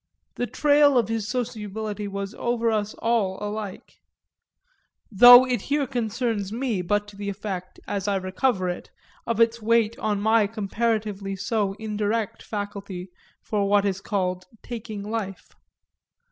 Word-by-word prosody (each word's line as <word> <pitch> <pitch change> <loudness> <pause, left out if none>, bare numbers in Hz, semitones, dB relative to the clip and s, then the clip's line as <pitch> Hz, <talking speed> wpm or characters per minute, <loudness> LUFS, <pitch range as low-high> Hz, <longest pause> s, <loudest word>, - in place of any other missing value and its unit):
The 245 - -2
trail 290 -1 +4
of 230 -3 +2
his 225 -2 -2
sociability 215 -3 -4
was 200 +1 -5
over 235 -1 0
us 210 -1 -1
all 220 -5 0
alike 210 -1 -6 1.1
though 245 +4 +10
it 250 -1 -1
here 290 0 +2
concerns 230 -4 -2
me 230 -4 -1
but 205 +3 0
to 205 - -14
the 200 0 -4
effect, 195 -2 -6
as 200 -1 -2
I 200 - +1
recover 185 +2 0
it, 175 - -4 0.4
of 230 -1 -1
its 230 0 +3
weight 230 0 +2
on 210 -2 0
my 220 0 +3
comparatively 210 -2 -2
so 195 +1 -1
indirect 215 +1 -2
faculty 200 -3 -6 0.3
for 200 -2 0
what 205 0 +4
is 195 -1 -1
called 185 -3 -2 0.2
taking 220 -3 -6
life. 205 -3 -5
210 Hz, 140 wpm, -25 LUFS, 200-230 Hz, 1.1 s, though